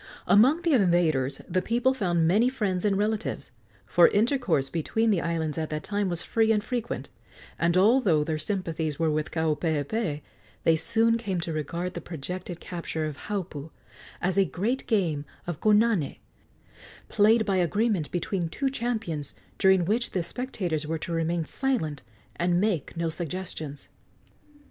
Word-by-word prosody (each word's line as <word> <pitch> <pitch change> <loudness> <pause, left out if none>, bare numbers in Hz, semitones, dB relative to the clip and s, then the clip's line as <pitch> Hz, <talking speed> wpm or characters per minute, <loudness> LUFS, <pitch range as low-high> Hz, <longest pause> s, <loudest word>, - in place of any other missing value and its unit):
Among 265 +12 +5
the 335 -3 +2
invaders 170 - +2
the 185 - 0
people 245 +5 +1
found 175 -9 +1
many 215 +8 +4
friends 200 -8 -1
and 200 -2 +2
relatives, 215 -5 -2 0.3
for 170 +11 +6
intercourse 215 - +1
between 220 +9 0
the 185 -5 +2
islands 165 -2 -2
at 155 - -3
that 155 0 -4
time 205 -2 -1
was 175 -1 -2
free 225 -1 +2
and 210 -2 +2
frequent; 235 +1 -4 0.5
and 170 +1 +2
although 195 - +4
their 155 0 -2
sympathies 165 -6 -2
were 165 -1 +1
with 150 0 -1
Kaupeepee, 160 - -1 0.4
they 165 - +4
soon 230 +7 +2
came 195 -6 -2
to 165 -1 -3
regard 170 +4 -3
the - - -5
projected 175 +2 -6
capture 165 -3 -4
of 155 -2 -4
Haupu 175 -8 -4 0.5
as 185 +2 +2
a - - +6
great 230 +10 -2
game 170 - +1 0.2
of 175 -4 -4
konane, 210 -7 +3 0.9
played 220 +2 +4
by 195 -2 +1
agreement 185 -1 +1
between 175 -1 -2
two 270 - -1
champions, 220 - -3 0.2
during 190 -3 +4
which 225 +6 0
the 180 - 0
spectators 175 - -3
were 160 +1 -1
to 160 - -6
remain 165 0 0
silent 185 - -1 0.4
and 175 0 +2
make 185 -6 -1
no 170 0 0
suggestions. 160 -3 -5
180 Hz, 155 wpm, -27 LUFS, 160-215 Hz, 0.9 s, for